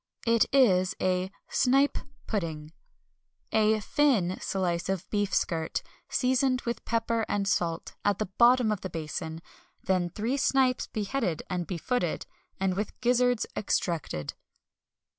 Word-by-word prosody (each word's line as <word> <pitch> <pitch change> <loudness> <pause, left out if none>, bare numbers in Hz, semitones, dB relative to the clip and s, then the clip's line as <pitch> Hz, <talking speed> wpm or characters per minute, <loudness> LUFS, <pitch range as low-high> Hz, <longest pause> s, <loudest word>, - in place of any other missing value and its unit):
It 230 -1 +4
is 190 -10 +4
a 185 0 0 0.2
Snipe 275 +3 +3 0.3
Pudding. 160 -7 -3 0.8
A 215 0 +3
thin 210 -9 +2
slice 180 -2 -1
of 190 -1 -2
beef 205 -2 0
skirt, 160 -2 -1 0.3
seasoned 255 0 +2
with 235 -1 -4
pepper 230 -1 0
and 200 -1 0
salt, 170 -3 -1
at 205 -2 +2
the 215 - -1
bottom 235 +3 +4
of 210 - -2
the 190 - -4
basin; 160 0 -5 0.4
then 185 -2 +1
three 225 +9 -2
snipes 260 -2 +2
beheaded 215 - -2
and 180 -2 -2
befooted, 180 +1 -1 0.3
and 190 -1 +1
with 205 +2 -4
gizzards 245 -1 +3
extracted. 165 - -2
205 Hz, 125 wpm, -28 LUFS, 180-245 Hz, 0.8 s, It